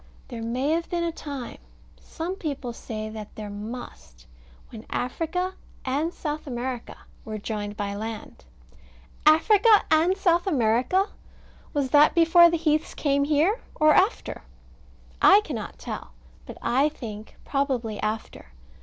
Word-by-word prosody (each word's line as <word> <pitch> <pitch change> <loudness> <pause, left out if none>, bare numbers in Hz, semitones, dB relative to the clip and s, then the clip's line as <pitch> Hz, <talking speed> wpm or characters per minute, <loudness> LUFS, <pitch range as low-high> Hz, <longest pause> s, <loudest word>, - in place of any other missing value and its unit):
There 235 -3 -6
may 250 +6 -1
have 335 +1 -1
been 345 -1 -1
a 340 - 0
time 280 -6 -7 0.4
some 335 +3 -5
people 280 -9 -4
say 215 -2 -6
that 215 -1 -9
there 210 -1 -6
must 210 - -9 0.4
when 225 -2 -10
Africa 335 +8 -2 0.3
and 290 +6 0
South 305 -3 -5
America 245 -1 -4 0.3
were 215 -1 -5
joined 205 -1 -5
by 200 -1 -2
land. 220 +1 -7 0.8
Africa 415 +8 +6
and 335 +4 +4
South 350 -2 +2
America! 255 - +2 0.7
Was 275 -3 0
that 295 +1 +6
before 340 +1 +7
the 335 - 0
heaths 310 -1 0
came 280 -1 +1
here, 310 +10 +2 0.2
or 310 0 +5
after? 395 +6 +1 0.8
I 400 +2 +8
cannot 425 - -6
tell: - - -7 0.3
but - - -9
I 265 +5 +3
think, 220 -7 -9
probably 255 -7 -1
after. 215 - -4
280 Hz, 135 wpm, -25 LUFS, 225-330 Hz, 0.8 s, I